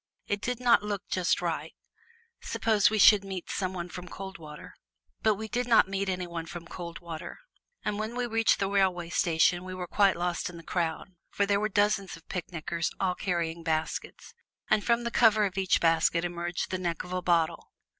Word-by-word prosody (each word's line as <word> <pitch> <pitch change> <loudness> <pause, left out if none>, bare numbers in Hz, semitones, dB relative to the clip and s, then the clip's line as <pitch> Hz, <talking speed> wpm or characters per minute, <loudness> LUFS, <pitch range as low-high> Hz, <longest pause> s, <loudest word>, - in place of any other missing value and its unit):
It 205 0 -2
did 250 -1 -2
not 240 -3 +5
look 205 -1 -4
just 185 -1 +1
right; - - -3 0.7
suppose 215 -3 +2
we 215 - -1
should 205 0 +7
meet 190 -3 -6
some 185 -1 -1
one 175 -2 -5
from 180 +1 -9
Coldwater? 165 -7 -9 0.5
But 215 - +3
we 220 +2 -6
did 245 +2 -2
not 230 -5 +5
meet 195 0 -2
any 180 -1 -2
one 170 -1 -6
from 170 0 -8
Coldwater. 170 -1 -7 0.5
And 210 0 -1
when 220 +2 -3
we 245 0 -1
reached 225 -1 +2
the 195 - 0
railway 190 -4 +1
station 175 +1 +2
we 185 0 -6
were 180 -1 -4
quite 195 +1 +3
lost 175 0 -1
in 175 - -10
the 165 - -11
crowd, 170 +2 -2 0.2
for 200 - 0
there 200 0 +2
were 215 +1 0
dozens 205 -3 +1
of 165 - -20
picnickers 170 -2 -3
all 185 -2 +1
carrying 170 -3 -2
baskets, 160 -1 -3 0.4
and 215 -1 +4
from 235 0 +2
the 235 - -2
cover 220 -3 +5
of 190 -2 -3
each 190 -2 +2
basket 165 +1 +3
emerged 175 0 -3
the 185 - -1
neck 170 -2 -2
of 180 0 -8
a 185 - -1
bottle. 170 -2 +1
185 Hz, 195 wpm, -28 LUFS, 170-205 Hz, 0.7 s, should